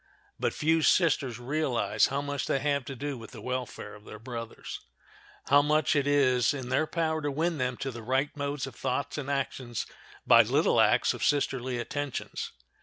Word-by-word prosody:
But - - +1
few 160 +1 +2
sisters 145 - +3
realize 120 -6 +1
how 140 +1 -2
much 145 -1 -3
they - - +2
have 140 -1 0
to 135 - -6
do 140 0 -4
with 115 - -10
the 120 - -11
welfare 125 -2 -5
of 105 - -13
their 105 - -10
brothers—how 120 +4 -3
much 155 +2 +2
it 145 -1 +2
is 135 -2 +3
in 130 -3 -5
their 130 +5 +1
power 160 -1 -1
to 145 - -1
win 160 +2 -1
them 125 -1 -1
to 135 - -3
the 120 -1 -8
right 130 +5 0
modes 145 0 -2
of 135 - -8
thoughts 130 +4 -2
and 140 -1 -5
actions 130 -4 -2 0.4
by - - +8
little - - +3
acts - - +4
of - - -5
sisterly 130 -3 +1
attentions. 145 +3 -4
135 Hz, 180 wpm, -29 LUFS, 125-145 Hz, 0.4 s, by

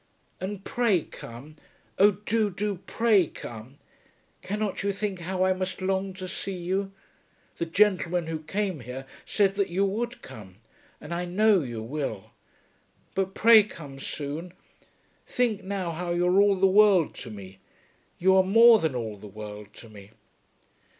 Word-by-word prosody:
And 195 +1 -5
pray 220 -9 +1
come. 135 +7 -11 0.4
Oh 200 +2 +8
do, 210 +2 0
do, 200 +1 -3
pray 215 -7 +3
come! 120 +3 -10 0.6
Cannot 210 +1 -3
you 200 0 0
think 200 -1 -3
how 185 +2 -2
I 185 0 +3
must 185 0 -4
long 190 0 -1
to 185 -1 -6
see 190 +1 -4
you! 190 +3 -2 0.7
The 170 - -2
gentleman 180 -2 +2
who 160 -1 -4
came 190 +1 -2
here 125 +2 -8 0.2
said 200 -2 +2
that 200 -1 -1
you 190 +3 +1
would 235 +5 -3
come, 95 -4 -11 0.4
and - - -7
I 175 +1 -2
know 200 +2 +3
you 120 -5 -5
will. 120 -5 -5 0.8
But 190 0 -2
pray 225 -1 +8
come 145 -9 -9
soon. 150 +6 -5 0.7
Think, 235 -5 0
now, 190 -3 -3
how 175 +1 -3
you 175 +1 +1
are 185 +2 +4
all 205 -1 +4
the 190 +1 +2
world 195 -3 +5
to 120 - -7
me. 95 -3 -10 0.6
You 190 +2 +4
are 190 - +6
more 225 +4 +7
than 160 -7 -1
all 110 -4 -4
the 105 - -11
world 105 0 -9
to 115 - -13
me. 100 -2 -13
185 Hz, 160 wpm, -26 LUFS, 145-200 Hz, 0.8 s, Oh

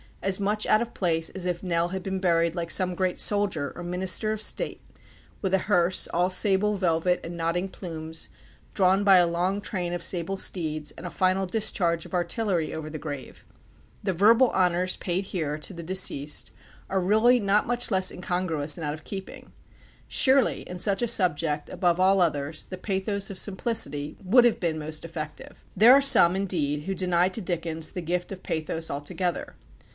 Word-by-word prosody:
as 195 0 +1
much 210 +2 0
out 215 - +4
of 235 0 -5
place 165 -3 0
as 190 -2 -3
if 175 -1 -2
Nell 170 -1 0
had 190 +1 -4
been 190 0 -3
buried 170 -2 +1
like 170 -1 -3
some 185 -1 +2
great 185 0 -1
soldier 200 -9 +1
or 175 - -7
minister 185 +4 0
of 215 -1 -4
state - - -1 0.6
with 190 -1 -1
a - - +6
hearse, 180 -2 +2
all 175 +2 0
sable 205 +2 +2
velvet 180 -1 +1
and 170 +1 -7
nodding 170 +3 -1
plumes, 160 -3 -7 0.4
drawn 190 0 +3
by 195 -2 +7
a 175 -1 +5
long 180 +4 -1
train 180 -4 -3
of 175 - -3
sable 180 +2 -1
steeds, 155 -5 -2
and - - -11
a 175 - -5
final 185 +2 +1
discharge 180 -5 0
of - - -13
artillery 175 -1 -1
over 155 -1 -6
the 155 0 -7
grave. 145 -4 -8 0.6
The 195 -2 0
verbal 225 +8 +5
honours 180 0 +1
paid 185 +2 -2
here 155 -6 -3
to 150 - -6
the 170 -1 -8
deceased 160 -5 +1 0.4
are 190 0 0
really 220 +6 +4
not 205 0 +1
much 245 +1 +1
less 190 -1 +3
incongruous 170 -5 -1
and 165 - -5
out 145 - -2
of 155 0 -10
keeping. 195 -2 -8 0.6
Surely 265 0 +3
in 180 0 -6
such 200 +2 +1
a 240 - +1
subject, 165 -8 0
above 175 -2 0
all 190 +1 +4
others, 155 -2 0
the 185 - -8
pathos 195 +1 -2
of 190 - -4
simplicity 190 - 0
would 240 +6 +5
have 240 - +2
been 165 -3 -1
most 155 0 -3
effective. 155 -2 -8
There 220 +6 +8
are 280 - +6
some, 185 -10 +5
indeed, 155 -7 -1
who 195 +3 -3
deny 180 -1 +1
to 205 +4 -4
Dickens 165 -3 -3
the 180 - -5
gift 175 +2 -3
of 190 -1 -8
pathos 160 +1 -3
altogether. 155 +5 -3
180 Hz, 185 wpm, -26 LUFS, 165-195 Hz, 0.6 s, There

